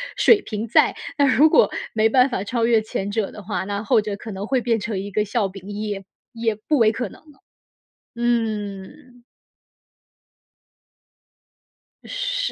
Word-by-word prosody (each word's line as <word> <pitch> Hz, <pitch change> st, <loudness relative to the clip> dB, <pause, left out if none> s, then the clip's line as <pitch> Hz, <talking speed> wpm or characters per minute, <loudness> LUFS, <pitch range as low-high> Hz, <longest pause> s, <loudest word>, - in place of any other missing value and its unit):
水 410 Hz, -3 st, +5 dB
平 220 Hz, +1 st, -5 dB
在。 225 Hz, -, +4 dB, 0.2 s
那 285 Hz, -, +4 dB
如 280 Hz, +6 st, +5 dB
果 480 Hz, -, +5 dB, 0.2 s
没 220 Hz, 0 st, +3 dB
办 255 Hz, +3 st, +4 dB
法 200 Hz, -6 st, -2 dB
超 230 Hz, +1 st, 0 dB
越 230 Hz, -2 st, +4 dB
前 205 Hz, -2 st, -4 dB
者 215 Hz, -2 st, -1 dB
的 210 Hz, -, -10 dB
话， 200 Hz, -1 st, -3 dB
那 200 Hz, +1 st, -3 dB
后 230 Hz, -3 st, +3 dB
者 205 Hz, -1 st, -4 dB
可 215 Hz, +1 st, -9 dB
能 195 Hz, +2 st, -5 dB
会 260 Hz, -2 st, +1 dB
变 230 Hz, -1 st, +1 dB
成 210 Hz, -1 st, -3 dB
一 200 Hz, +1 st, -6 dB
个 210 Hz, +2 st, 0 dB
笑 205 Hz, -2 st, 0 dB
柄， 195 Hz, +1 st, -11 dB
也 205 Hz, -2 st, -4 dB, 0.3 s
也 230 Hz, -2 st, -1 dB
不 285 Hz, +8 st, -1 dB
为 220 Hz, -2 st, +5 dB
可 240 Hz, -3 st, -4 dB
能 -, -, -15 dB
了。 295 Hz, -3 st, -21 dB, 0.8 s
嗯。 235 Hz, +2 st, -3 dB, 2.8 s
是。 -, -, -2 dB
220 Hz, 175 characters per minute, -22 LUFS, 205-250 Hz, 2.8 s, 水